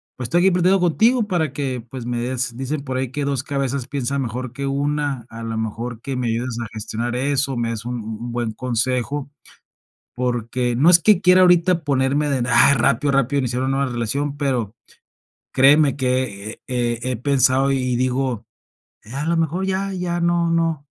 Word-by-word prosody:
pues, 125 - -5
estoy 175 +9 +2
aquí 190 +1 +5
platicando 180 +2 +3
contigo 225 +8 +3
para 165 -7 0
que, 130 -4 -3
pues, 130 -3 -7
me 120 0 -2
des 125 -1 -3
dicen 140 +2 -3
por 130 -2 -3
ahí 130 -1 -2
que 145 +1 -3
2 140 -2 -1
cabezas 135 -2 -2
piensan 140 0 -2
mejor 125 +1 -4
que 140 0 -4
1 140 -2 -1
A 115 - -9
la 115 0 -4
mejor 110 +1 -4
que 135 +1 -4
me 125 -1 -2
ayudes 115 +1 -2
a - - -6
gestionar 115 +2 -4
eso, 135 0 0
me 120 -1 -1
des 115 0 -6
un 125 - -3
un 115 - -5 0.2
un 120 0 -5
buen 120 -1 -2
consejo. 125 +4 -2 0.8
Porque, 120 0 -1
no 155 +6 +5
es 175 -1 +7
que 205 0 +4
quiera 180 0 +6
ahorita 175 -1 +4
ponerme 140 +1 +1
de, 130 -3 0
ah, 120 +4 +6
rápido, 135 +3 +2
rápido 140 +1 +1
iniciar 125 -1 -1
una 135 - 0
nueva 140 -2 0
relación, 140 +5 -2
pero, 125 -7 -1 0.8
créeme 140 +1 +5
que 125 -6 -1
eh - - -14
eh 120 -2 -1
eh 130 - -1
eh, - - -1
pensado 135 +1 +2
y 130 -2 0
digo, 125 -2 -1 0.6
ya, 125 +6 -6
a - - -3
lo 170 +1 +1
mejor 165 +4 0
ya 195 +1 -1
ya 175 -2 -2
no 170 0 +2
no 165 -3 0
130 Hz, 195 wpm, -21 LUFS, 120-145 Hz, 0.8 s, es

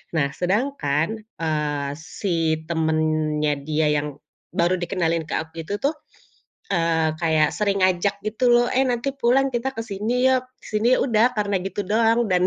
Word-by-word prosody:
Nah, 145 -3 +2
sedangkan, 200 - -1 0.2
eee, 150 -3 -1
si 165 -1 -1
temennya 155 -2 +1
dia 155 0 +1
yang 145 +1 -1 0.4
baru 175 +2 +2
dikenalin 170 -2 0
ke - - -1
aku 160 0 -12
itu 200 - -3
tuh, 285 +3 +2 0.8
eee, 165 -3 +2
kayak 160 -2 +3
sering 200 -2 0
ngajak 185 +2 +2
gitu 220 +4 -2
loh, 240 0 +5
"Eh, 265 +1 +2
nanti 245 +2 0
pulang 270 +1 +3
kita 240 +3 0
ke 225 - -2
sini 230 +4 0
yuk, 260 -1 +2 0.2
ke - - -13
sini." 230 +4 +3
Udah 240 0 +3
karena 205 -1 0
gitu 195 +2 -3
doang. 225 +3 +3
Dan, 180 0 +3
185 Hz, 160 wpm, -23 LUFS, 160-230 Hz, 0.8 s, loh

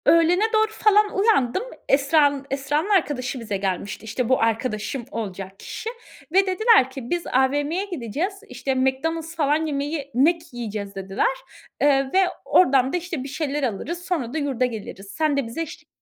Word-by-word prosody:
Öğlene 335 +4 +5
doğru 435 0 +3
falan 420 -1 +3
uyandım. 395 - +2 0.3
Esra'nın, 285 0 +3
Esra'nın 290 +6 -1
arkadaşı 290 -10 +1
bize 215 -4 -3
gelmişti, 195 +2 -3
işte, 225 +2 -2
bu 260 - +3
arkadaşım 225 +2 -1
olacak 195 -3 -6
kişi 445 - -6 0.4
ve 385 +3 +5
dediler 380 - +4
ki, 260 -2 -8
"Biz 350 -1 -2
AVM'ye 290 +8 +1
gideceğiz, 335 - -3 0.2
işte, 270 -1 -2
McDonald's 320 +6 -1
falan 305 0 +1
yemeği 285 -1 -3
Mac 315 +7 +4
yiyeceğiz." 210 -4 -5
dediler. 195 - 0 0.5
Iıı, 275 -2 +3
ve 380 - +5 0.3
oradan 270 -6 +4
da, - - +2
işte, 340 -6 -4
bir - - -6
şeyler 290 0 -2
alırız, 310 - -3
sonra 280 -10 -2
da - - -1
yurda 275 -4 0
geliriz. 210 -4 -6
Sen 310 -2 +2
de 280 - 0
bize 235 +8 -5
eşlik 320 -2 -7
280 Hz, 160 wpm, -23 LUFS, 245-330 Hz, 0.5 s, Öğlene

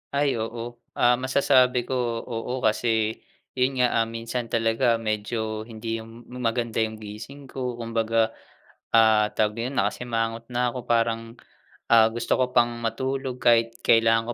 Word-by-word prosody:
Ay 140 -5 +1
oo. 115 +1 -5 0.2
Ah, 120 0 +3
masasabi 130 -1 +3
ko, 130 - -5 0.3
oo 125 +2 -4
kasi. 110 0 +1 0.4
Yun 130 0 +1
nga 115 -2 +3
minsan 115 +1 -4
talaga 115 +1 +2
medyo 110 0 -3
hindi 115 0 -4
yung 115 +1 -12
maganda 120 -2 -2
yung 110 0 0
gising 110 +7 -9
ko 125 -2 -3
kumbaga, 115 -1 0 0.7
ah, 110 -1 +6
tawag 105 0 +1
na - - -1
yun 135 - -6
nakasimangot 115 -3 -1
na 125 0 +1
ko 125 -1 -7
parang, 115 -1 0 0.6
ah, 110 -1 +7
gusto 115 +1 -1
ko 125 - +1
pang 120 0 +4
matulog 130 +3 -2
kahit 115 -1 +3
kailangan 115 0 +4
115 Hz, 140 wpm, -25 LUFS, 115-125 Hz, 0.7 s, ah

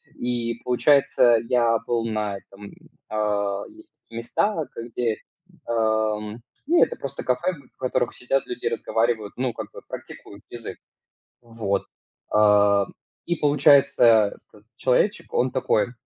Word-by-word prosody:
И, 120 -1 -2
получается, 125 -2 +4
я 120 -2 +3
был 120 -1 -1
на 105 -3 -2
этом, 100 +1 -13 0.4
э 105 -2 -1
Есть 330 +1 -18
такие 115 - -11
места, 160 - -1
где, 115 -1 -2 0.5
ам, 110 -1 0 0.3
ну, 340 +2 +5
это - - -1
просто 140 0 -6
кафе, 170 +9 0 0.2
в - - -58
которых 125 -2 -1
сидят 135 +2 -1
люди, 125 0 -6
разговаривают, 115 -2 -1
ну, 125 -1 -1
как - - -7
бы - - -11
практикуют 100 0 -10
язык. 120 -2 -8 0.6
Вот, 115 -4 -2 0.5
а. 100 -2 +4 0.4
И 175 - 0
получается 140 -7 +4
как? 105 - -20
Человечек, 130 - +1
он 130 +1 +1
такой: 125 -2 0
115 Hz, 125 wpm, -24 LUFS, 105-125 Hz, 0.6 s, ну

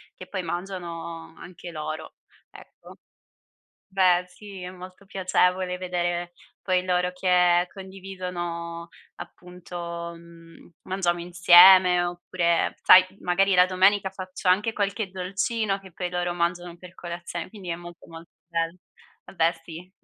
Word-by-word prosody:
che 185 - -10
poi 190 -2 -4
mangiano 170 -2 -6
anche 175 0 -11
loro, 155 0 -6 0.3
ecco. - - -16 0.9
Beh, 185 -2 +3
sì, 195 0 -12
è 180 - -6
molto 185 +2 -12
piacevole 180 -1 0
vedere 175 -1 -2 0.3
poi 185 -1 0
loro 180 0 0
che 180 -1 +3
condividono, 180 -3 -6 0.3
appunto 180 0 -11 0.4
uhm, 165 0 -16
mangiamo 175 -2 -1
insieme, 180 +1 +7
oppure 175 -1 -1
sai, 185 0 +8
magari 190 +2 +2
la 180 0 +7
domenica 190 +1 +2
faccio 185 0 -5
anche 205 +5 +3
qualche 205 0 -2
dolcino 195 +3 -2
che 190 -2 -15
poi 180 +1 -4
loro 175 0 -2
mangiano 175 0 -2
per 180 +1 -14
colazione, 170 -1 -6
quindi 190 -3 -11
è 170 - -2
molto, 175 0 -12
molto 165 0 -12 0.2
bello 165 0 -2 0.5
vabbè 165 -1 +1
sì. 175 +2 -10
180 Hz, 125 wpm, -25 LUFS, 175-185 Hz, 0.9 s, sai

